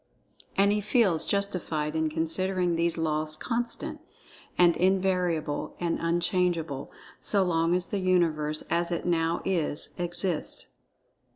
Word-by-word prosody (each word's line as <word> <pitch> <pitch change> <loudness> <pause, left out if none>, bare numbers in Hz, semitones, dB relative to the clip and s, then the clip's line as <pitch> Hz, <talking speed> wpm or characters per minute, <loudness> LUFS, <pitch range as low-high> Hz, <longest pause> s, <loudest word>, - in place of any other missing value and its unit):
And 200 +1 +5
he 210 0 +1
feels 205 -6 +2
justified 170 -6 -1
in 160 0 +1
considering 175 +3 0
these 170 0 +1
Laws 155 -1 -1
constant, 235 +8 -3 0.6
and 175 -1 +5
invariable, 180 -5 0
and 170 -1 -1
unchangeable 170 -4 0 0.3
so 200 -2 +2
long 165 -1 +2
as 180 0 -2
the 205 - -1
Universe, 160 -5 +1
as 170 +1 +1
it 170 - -2
now 165 -1 +1
is, 165 -5 -1
exists. 175 -1 -1
170 Hz, 120 wpm, -28 LUFS, 160-185 Hz, 0.6 s, And